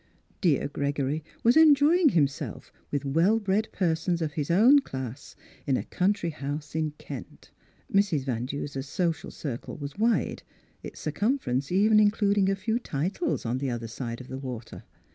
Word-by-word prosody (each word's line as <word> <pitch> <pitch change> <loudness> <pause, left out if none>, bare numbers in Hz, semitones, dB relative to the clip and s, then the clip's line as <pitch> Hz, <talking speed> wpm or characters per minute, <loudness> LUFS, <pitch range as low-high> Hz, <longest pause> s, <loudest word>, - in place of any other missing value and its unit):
Dear 160 -9 +2
Gregory 140 +1 -2 0.2
was 235 +1 +5
enjoying 315 +2 +6
himself 145 - -1 0.2
with 145 -1 -2
well 170 +11 +3
bred 205 +1 0
persons 170 -1 0
of 155 -3 -2
his 150 -4 -3
own 230 +12 +6
class 130 - -7 0.3
in 135 -2 +2
a - - -3
country 185 -2 0
house 145 0 -5
in 155 -1 -1
Kent. 140 -4 -10 0.4
Mrs. 195 -8 +2
Van 125 -2 -2
Du 140 +2 -3
ser's 140 -1 -6
social 170 +1 -1
circle 130 -6 -6
was 145 +6 -7
wide, 230 +1 +1 0.4
its - - -9
circumfer 210 - -1
ence 130 +4 -1
even 210 +3 +5
including 205 -2 +3
a 195 - +2
few 220 +4 -1
titles 190 - -2
on 120 +3 -1
the 135 -1 -2
other 120 -2 -4
side 115 +1 -5
of 130 - -10
the 130 - -6
water. 125 -4 -7
160 Hz, 165 wpm, -27 LUFS, 140-205 Hz, 0.4 s, enjoying